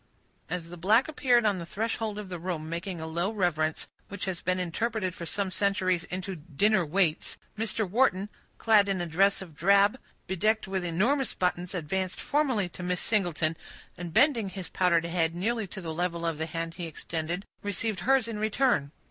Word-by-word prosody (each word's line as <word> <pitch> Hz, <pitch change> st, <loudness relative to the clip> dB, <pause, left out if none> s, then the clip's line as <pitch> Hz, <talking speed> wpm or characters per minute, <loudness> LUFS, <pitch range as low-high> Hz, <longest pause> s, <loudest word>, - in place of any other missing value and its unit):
As 170 Hz, -1 st, -4 dB
the 175 Hz, -, -8 dB
black 215 Hz, -, +4 dB
appeared 250 Hz, -6 st, +3 dB
on 200 Hz, -3 st, +2 dB
the 170 Hz, -, -5 dB
threshold 220 Hz, +1 st, -2 dB
of 210 Hz, -2 st, -5 dB
the 180 Hz, -2 st, -5 dB
room, 165 Hz, -3 st, -3 dB
making 170 Hz, +2 st, -4 dB
a 160 Hz, -, -5 dB
low 170 Hz, +4 st, -1 dB
reverence, 160 Hz, -7 st, 0 dB, 0.2 s
which 200 Hz, -1 st, -4 dB
has 185 Hz, -3 st, -3 dB
been 185 Hz, +1 st, 0 dB
interpreted 185 Hz, +2 st, -1 dB
for 170 Hz, -2 st, -7 dB
some 195 Hz, 0 st, -2 dB
centuries 185 Hz, -3 st, +1 dB
into 185 Hz, +1 st, -4 dB
"dinner 175 Hz, +6 st, +2 dB
waits," 165 Hz, 0 st, 0 dB, 0.2 s
Mr. 220 Hz, -1 st, 0 dB
Wharton, 200 Hz, -2 st, +2 dB, 0.3 s
clad 210 Hz, -3 st, +4 dB
in 195 Hz, -2 st, 0 dB
a 175 Hz, -, -1 dB
dress 195 Hz, +4 st, +2 dB
of 165 Hz, -5 st, -14 dB
drab, 200 Hz, -, +4 dB, 0.3 s
bedecked 215 Hz, +4 st, +1 dB
with 190 Hz, -1 st, -2 dB
enormous 225 Hz, -, +1 dB
buttons, 180 Hz, 0 st, -1 dB
advanced 185 Hz, +3 st, -2 dB
formally 265 Hz, -10 st, +1 dB
to 180 Hz, -, -10 dB
Miss 180 Hz, 0 st, -1 dB
Singleton, 175 Hz, -6 st, +1 dB, 0.4 s
and 175 Hz, -1 st, -6 dB
bending 230 Hz, -, +4 dB
his 190 Hz, -2 st, -7 dB
powdered 170 Hz, -2 st, +2 dB
head 165 Hz, -1 st, 0 dB
nearly 220 Hz, +4 st, -1 dB
to 190 Hz, +1 st, -8 dB
the 165 Hz, -2 st, -4 dB
level 170 Hz, 0 st, -2 dB
of 165 Hz, -2 st, -1 dB
the 160 Hz, -, -1 dB
hand 165 Hz, +1 st, -4 dB
he 170 Hz, 0 st, -5 dB
extended, 165 Hz, +4 st, -4 dB, 0.2 s
received 205 Hz, +1 st, -2 dB
hers 265 Hz, -2 st, +3 dB
in 220 Hz, -2 st, -4 dB
return. 215 Hz, -, +1 dB
185 Hz, 185 wpm, -28 LUFS, 170-210 Hz, 0.4 s, black